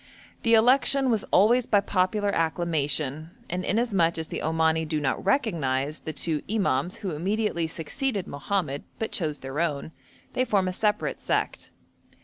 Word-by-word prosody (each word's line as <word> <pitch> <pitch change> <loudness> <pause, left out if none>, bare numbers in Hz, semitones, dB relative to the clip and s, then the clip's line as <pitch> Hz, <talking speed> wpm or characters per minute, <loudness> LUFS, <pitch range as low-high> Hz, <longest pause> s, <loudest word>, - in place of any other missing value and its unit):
The 230 -1 +4
election 255 +3 +4
was 220 -3 0
always 235 +5 +4
by 205 - +4
popular 200 +1 +1
acclamation, 155 -3 -1 0.2
and 180 +1 -2
inasmuch 195 -7 +1
as 160 -1 -4
the - - -4
Omani 160 0 +2
do 155 -1 -1
not 140 -3 -1
recognise 155 - 0
the 155 - -4
two 155 -1 -1
'imams' 185 -6 0
who 190 - -1
immediately 180 +1 -1
succeeded 185 - -3
Mohammed, 145 -1 -2
but 220 - -3
chose 155 -5 -2
their 135 +3 -5
own, 155 -2 -1 0.4
they 255 - +1
form 200 -6 +1
a 185 - -1
separate 210 +2 0
sect. - - -1
170 Hz, 150 wpm, -26 LUFS, 155-210 Hz, 0.4 s, The